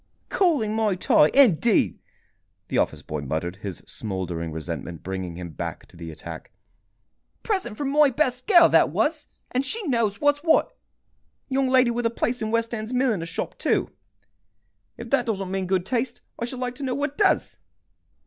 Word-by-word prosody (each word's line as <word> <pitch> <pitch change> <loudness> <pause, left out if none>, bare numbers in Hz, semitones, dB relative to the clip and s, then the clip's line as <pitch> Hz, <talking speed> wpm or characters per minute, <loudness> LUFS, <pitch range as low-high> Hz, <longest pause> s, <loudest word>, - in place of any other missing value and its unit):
"Calling 290 - +2
my 215 -3 +1
tie, 165 -4 +4
indeed!" 235 - +4 0.7
the - - +1
office - - -1
boy 75 -1 -4
muttered, 80 +6 -3
his 95 -3 -7
smouldering 90 -5 -4
resentment 80 +1 -6
bringing 95 -2 -4
him 85 -1 -7
back - - -6
to - - -21
the 85 -1 -8
attack. 80 0 -9 0.9
"Present 380 - -2
from 280 -2 -2
my 295 0 +5
best 255 -1 -1
girl, 345 -5 +8
that - - +5
was, 305 -1 0 0.2
and 255 +2 +1
she 440 +11 -3
knows 230 - 0
what's 290 0 +3
what. 320 +1 +2 0.7
Young 270 0 +1
lady 255 -2 +4
with 235 0 0
a - - 0
place 240 +1 -2
in 220 - -1
a - - -4
west 230 0 0
end 220 0 -4
milliner's 240 -10 0
shop, 165 - -5
too. - - +1 1.1
If 235 - -9
that 255 -3 +2
doesn't 195 -4 -2
mean 190 -1 -2
good 185 -1 +1
taste, 240 +2 -2 0.2
I 235 - -1
should 250 +2 -7
like 250 -1 -2
to 285 - -6
know 255 -2 -1
what 285 0 -2
does. 395 +2 +2
230 Hz, 175 wpm, -24 LUFS, -, 1.1 s, girl